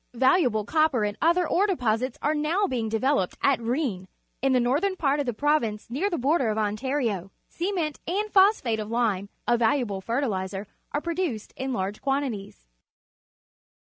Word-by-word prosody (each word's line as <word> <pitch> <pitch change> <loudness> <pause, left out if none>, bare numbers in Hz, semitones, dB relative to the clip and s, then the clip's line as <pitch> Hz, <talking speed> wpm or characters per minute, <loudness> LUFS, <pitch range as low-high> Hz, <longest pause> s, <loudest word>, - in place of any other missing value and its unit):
Valuable 255 - +3
copper 310 -5 +2
and 205 0 -1
other 345 +2 +3
ore 400 +4 +2
deposits 250 - 0
are 300 - +2
now 315 +7 +1
being 235 - -2
develope 225 -3 +1
d - - -19
at 275 -4 +4
Rou 235 +2 -1
vn 200 -12 -2 0.3
in 270 +1 +2
the 255 - +4
northern 290 +11 +1
par^of 285 -4 0
the - - +1
province 235 -5 0
near 330 +11 0
the 345 - -2
border 270 -1 +2
of 215 - -1
Ontario. 215 -2 -1 0.2
Ce 355 +4 -2
ment 320 -6 -2
and 410 +5 -1
phosphate 380 - +4
of 210 0 -5
lime, 215 -5 0 0.2
a 240 - +3
valuable 225 -4 +1
fertihzer, 200 -5 -2 0.3
are 290 - -1
produced 335 - -3
in 265 0 -3
large 195 -2 -3
quantities. 255 - -3
255 Hz, 170 wpm, -26 LUFS, 215-310 Hz, 0.3 s, at